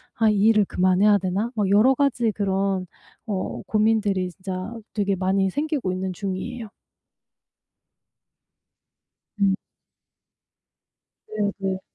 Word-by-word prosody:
'아 225 -2 +3
이 210 - +2
일을 215 -2 +5
그만해야 185 +3 +3
되나?' 195 +5 -1
막 205 -3 0
여러 215 +7 +5
가지 245 -5 +1
그런 195 -2 0 0.4
어 195 -4 -3
고민들이 210 -4 +1
진짜 185 +3 -6 0.2
되게 200 -2 0
많이 190 +1 +1
생기고 290 - -2
있는 185 0 -3
중이에요. 205 +5 -5 2.7
음. 195 -1 +4 1.8
네네. 200 -2 -1
200 Hz, 200 characters per minute, -24 LUFS, 190-220 Hz, 2.7 s, 일을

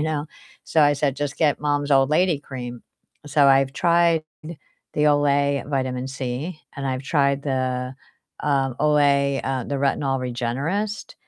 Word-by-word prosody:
you - - 0
know? 155 -2 -1 0.4
So, 160 - +1
I 145 0 +4
said, 140 -2 -1
"Just 145 -1 -3
get 150 -3 +1
mom's 145 0 -1
old 135 -1 +4
lady 165 +1 +2
cream," 125 -4 -8 0.4
so 145 -1 +3
I've 135 0 +4
tried 170 -2 +3 0.7
the 150 - 0
Olay 145 -1 +2
Vitamin 130 -2 -2
C, 135 +5 -5 0.2
and 140 - -5
I've 130 0 -2
tried 140 -1 +1
the, 130 -2 -2 0.5
um, 135 -3 +1
Olay, 140 -2 +3
uh, 135 -1 -1
the 140 - -3
Retinol 135 -1 0
Regenerist, 135 - -3
140 Hz, 150 wpm, -23 LUFS, 135-150 Hz, 0.7 s, I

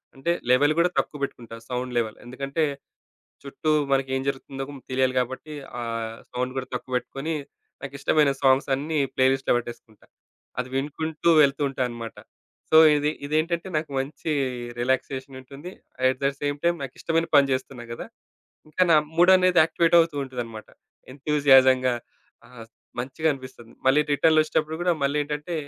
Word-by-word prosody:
అంటే, 135 +6 -1 0.2
లెవెల్ 145 +4 +4
గూడా 175 +1 +3
తక్కువ 150 - -3
పెట్టుకుంటా 120 -4 -6
సౌండ్ 125 0 -3
లెవెల్. 110 -2 -1
ఎందుకంటే, 135 +5 -3 0.8
చుట్టూ 140 +2 -4 0.2
మనకేం 135 -1 +1
జరుగుతుందో 135 0 -4 0.3
తెలియాలి 130 0 +1
గాబట్టి 130 +5 -4 0.3
ఆ! - - -4 0.5
సౌండ్ 125 +1 -2
గూడా 130 - -3
తక్కువ 125 - -7
పెట్టుకొని 135 +5 -5 0.5
నాకిష్టమైన 140 +2 +1
సాంగ్స్ 135 +1 +4
అన్నీ 155 +3 -3 0.2
ప్లేలిస్ట్‌లో 130 +1 +2
పెట్టేసుకుంటా. 120 -3 -9 0.5
అది 125 - -2
వినుకుంటూ 155 +4 -1
వెళ్తూ 140 0 +2
ఉంటా 135 - -5
అనమాట. 115 -1 -8 0.5
సో, 155 - +6 0.2
ఇది 150 0 +1 0.2
ఇదేంటంటే 165 +4 -1
నాకు 155 -1 -4
మంచి 140 +3 -4 0.5
రిలాక్సేషన్ 130 +1 -2
ఉంటుంది. 140 +7 -10 0.4
అట్ 130 0 0
ద - - +4
సేమ్ 145 0 -1
టైమ్ 170 0 +2
నాకిష్టమైన 165 +4 -1
పని 140 -1 +6
జేస్తున్నా 130 -1 -3
గదా! - - -7 0.6
ఇంకా 185 - +2
నా - - +7 0.2
మూడ్ 175 +2 +6
అనేది 185 -1 +4
యాక్టివేట్ 165 +1 +2
అవుతూ 165 -2 +2
ఉంటదనమాట. 120 -4 -7 0.5
ఎంతూసియాజం‌గా 135 -3 +4 0.5
ఆ! - - -20 0.5
మంచిగా 135 +6 -2
అనిపిస్తుంది. 130 -3 -12
మళ్ళీ 135 +3 +5
రిటర్న్‌లో 155 +2 +4
ఒచ్చేటప్పుడు 155 0 -1
కూడా 175 0 +2
మళ్ళీ 140 +1 +1
ఏంటంటే 150 +3 -5
135 Hz, 140 wpm, -25 LUFS, 130-155 Hz, 0.8 s, నా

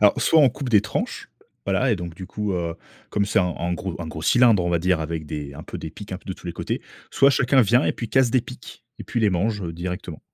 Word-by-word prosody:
Alors 105 -1 +4
soit 160 - +5
on 140 - +7
coupe 130 +2 -5
des 110 -4 +5
tranches, 105 - -4 0.4
voilà 105 +6 +2
et - - +1
donc 85 -2 -6
du 95 - -8
coup, 105 0 -3
heu, 85 -2 -2 0.4
comme 105 - +1
c'est 110 +2 +1
un 90 -3 +1
un 85 +1 -1
gros 90 0 -4
un 85 - -4
gros 80 0 -7
cylindre, 115 -2 +5
on 90 - 0
va 85 - +2
dire 90 0 +1
avec 80 0 -4
des 75 -2 -5
un 80 - -8
peu - - -7
des 80 - -6
piques 100 +4 -10
un 95 - -4
peu - - -26
de - - -1
tous - - -13
les 85 - -3
côtés, - - -3 0.3
soit 140 - +5
chacun 135 0 +4
vient 120 +6 +3
et - - +2
puis 115 - -6
casse 130 0 +3
des 130 +1 +3
piques 125 -1 -11
et - - -7
puis 120 - -2
les 105 -2 +3
mange, 100 +3 0
heu, 85 - -4
directement. 85 -1 -5
95 Hz, 285 wpm, -23 LUFS, 85-115 Hz, 0.4 s, on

